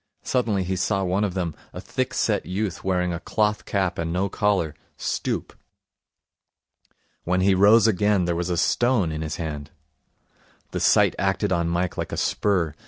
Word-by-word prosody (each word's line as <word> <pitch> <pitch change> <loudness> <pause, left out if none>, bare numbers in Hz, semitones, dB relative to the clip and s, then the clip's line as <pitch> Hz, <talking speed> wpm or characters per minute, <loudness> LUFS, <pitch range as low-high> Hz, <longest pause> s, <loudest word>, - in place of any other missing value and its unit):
Suddenly 115 -7 0
he 95 +1 -2
saw 95 +1 0
one 95 +3 0
of 100 -3 -2
them, 85 -4 -2 0.2
a - - -6
thick - - -3
set - - 0
youth 95 0 -3
wearing 90 -2 0
a 85 - -3
cloth 105 +3 0
cap 95 -4 -1
and 80 0 -2
no 95 +3 0
collar, 95 -7 0 0.2
stoop. - - -3 1.7
When 90 +1 +1
he 95 +1 +4
rose 100 +4 +6
again 105 -3 +2
there 85 -1 0
was 85 +1 -2
a 90 - 0
stone 120 -4 +2
in 80 0 -4
his 80 -1 -3
hand. 75 -3 -5 1.0
The - - -3
sight - - +4
acted 95 +1 0
on 85 -2 +1
Mike 85 +1 -1
like - - -3
a - - -4
spur. 90 -7 0
95 Hz, 170 wpm, -24 LUFS, 85-100 Hz, 1.7 s, rose